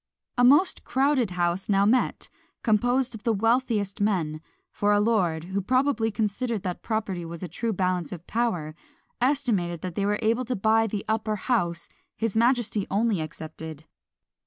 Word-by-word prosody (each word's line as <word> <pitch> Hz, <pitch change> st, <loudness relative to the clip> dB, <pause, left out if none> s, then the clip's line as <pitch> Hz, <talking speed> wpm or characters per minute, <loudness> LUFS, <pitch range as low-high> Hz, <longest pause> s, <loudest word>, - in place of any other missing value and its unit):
A 245 Hz, -, +2 dB
most 290 Hz, +9 st, +5 dB
crowded 265 Hz, -3 st, +2 dB
house 180 Hz, +2 st, -1 dB
now 200 Hz, 0 st, +4 dB
met, 245 Hz, +4 st, +1 dB, 0.4 s
composed 245 Hz, +3 st, +2 dB
of 220 Hz, -, -8 dB
the 235 Hz, -, +1 dB
wealthiest 225 Hz, -2 st, +1 dB
men; 165 Hz, -7 st, 0 dB, 0.3 s
for 205 Hz, 0 st, +1 dB
a 205 Hz, -, +4 dB
lord, 190 Hz, -8 st, +1 dB
who 190 Hz, +3 st, -2 dB
probably 255 Hz, +1 st, +1 dB
considered 220 Hz, +1 st, -2 dB
that 180 Hz, -2 st, -4 dB
property 205 Hz, -6 st, -2 dB
was 165 Hz, 0 st, -7 dB
the 180 Hz, -, -4 dB
true 225 Hz, +8 st, -2 dB
balance 180 Hz, -5 st, -1 dB
of 175 Hz, -1 st, -8 dB
power, 180 Hz, -10 st, -1 dB, 0.5 s
estimated 230 Hz, -, +1 dB
that 185 Hz, -2 st, -4 dB
they 200 Hz, +3 st, -1 dB
were 210 Hz, 0 st, +1 dB
able 230 Hz, +3 st, +1 dB
to 250 Hz, +1 st, -2 dB
buy 220 Hz, +2 st, +3 dB
the 205 Hz, -1 st, -4 dB
upper 220 Hz, 0 st, 0 dB
house, 175 Hz, -7 st, -1 dB, 0.3 s
his 225 Hz, -2 st, -1 dB
majesty 235 Hz, -3 st, +2 dB
only 205 Hz, -2 st, +1 dB
excepted! 155 Hz, 0 st, -8 dB
210 Hz, 160 wpm, -26 LUFS, 180-235 Hz, 0.5 s, most